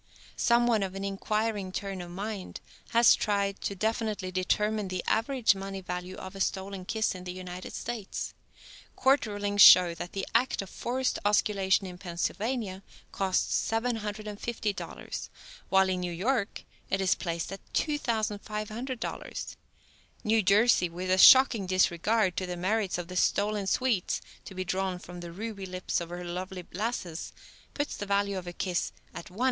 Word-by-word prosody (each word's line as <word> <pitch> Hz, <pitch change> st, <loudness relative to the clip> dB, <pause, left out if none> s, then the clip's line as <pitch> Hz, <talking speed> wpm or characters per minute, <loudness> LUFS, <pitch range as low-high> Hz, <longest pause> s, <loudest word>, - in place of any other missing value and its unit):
Some 235 Hz, 0 st, +3 dB
one 230 Hz, -3 st, +3 dB
of 190 Hz, -1 st, -3 dB
an 195 Hz, -, -4 dB
inquiring 205 Hz, 0 st, -1 dB
turn 195 Hz, -1 st, -4 dB
of 175 Hz, -, -8 dB
mind 195 Hz, +1 st, -5 dB, 0.3 s
has 235 Hz, 0 st, +6 dB
tried 200 Hz, -2 st, 0 dB
to 200 Hz, -, -2 dB
definitely 215 Hz, -2 st, -1 dB
determine 210 Hz, +3 st, 0 dB
the 185 Hz, -1 st, -3 dB
average 240 Hz, 0 st, +3 dB
money 195 Hz, 0 st, -5 dB
value 180 Hz, 0 st, -5 dB
of 185 Hz, +1 st, -8 dB
a 195 Hz, -, -5 dB
stolen 190 Hz, -1 st, -2 dB
kiss 220 Hz, +2 st, 0 dB
in 185 Hz, -1 st, -8 dB
the 180 Hz, -, -5 dB
United 180 Hz, 0 st, -7 dB
States. 230 Hz, -4 st, -5 dB, 0.6 s
Court 265 Hz, -2 st, +3 dB
rulings 205 Hz, 0 st, 0 dB
show 180 Hz, -3 st, +10 dB
that 170 Hz, +2 st, -7 dB
the 195 Hz, -1 st, -2 dB
act 235 Hz, -3 st, +2 dB
of 195 Hz, -, -12 dB
forced 255 Hz, +2 st, -1 dB
osculation 200 Hz, -2 st, +2 dB
in 180 Hz, -1 st, -8 dB
Pennsylvania 195 Hz, +3 st, -2 dB, 0.3 s
costs 190 Hz, -1 st, 0 dB
$750, 215 Hz, -2 st, -3 dB, 0.4 s
while 190 Hz, 0 st, +5 dB
in 185 Hz, -1 st, 0 dB
New 180 Hz, -1 st, -3 dB
York 205 Hz, +5 st, -1 dB, 0.3 s
it 195 Hz, -, +1 dB
is 190 Hz, -1 st, +3 dB
placed 170 Hz, 0 st, -3 dB
at 195 Hz, -, -7 dB
$2,500. 220 Hz, -3 st, -3 dB, 0.7 s
New 220 Hz, +1 st, +3 dB
Jersey, 200 Hz, -1 st, +4 dB
with 180 Hz, +2 st, -4 dB
a 185 Hz, -, +3 dB
shocking 245 Hz, -6 st, +8 dB
disregard 185 Hz, +2 st, +2 dB
to 185 Hz, -, -1 dB
the 180 Hz, 0 st, -4 dB
merits 195 Hz, +1 st, 0 dB
of 175 Hz, -1 st, -5 dB
the 180 Hz, -, -8 dB
stolen 205 Hz, +2 st, +1 dB
sweets 235 Hz, -5 st, +1 dB, 0.3 s
to 190 Hz, -, -9 dB
be 185 Hz, 0 st, -3 dB
drawn 185 Hz, 0 st, -1 dB
from 180 Hz, 0 st, -10 dB
the 170 Hz, -1 st, -7 dB
ruby 200 Hz, +1 st, -6 dB
lips 185 Hz, -1 st, -2 dB
of 170 Hz, -, -6 dB
her 175 Hz, +1 st, -6 dB
lovely 180 Hz, +1 st, -5 dB
lasses, 195 Hz, -6 st, -3 dB, 0.4 s
puts 290 Hz, 0 st, -2 dB
the 205 Hz, -, -5 dB
value 200 Hz, -1 st, +1 dB
of 180 Hz, -, -11 dB
a -, -, -3 dB
kiss 180 Hz, -1 st, -2 dB, 0.2 s
at -, -, -7 dB
$1.15. 185 Hz, +5 st, -13 dB
195 Hz, 160 wpm, -29 LUFS, 185-220 Hz, 0.7 s, show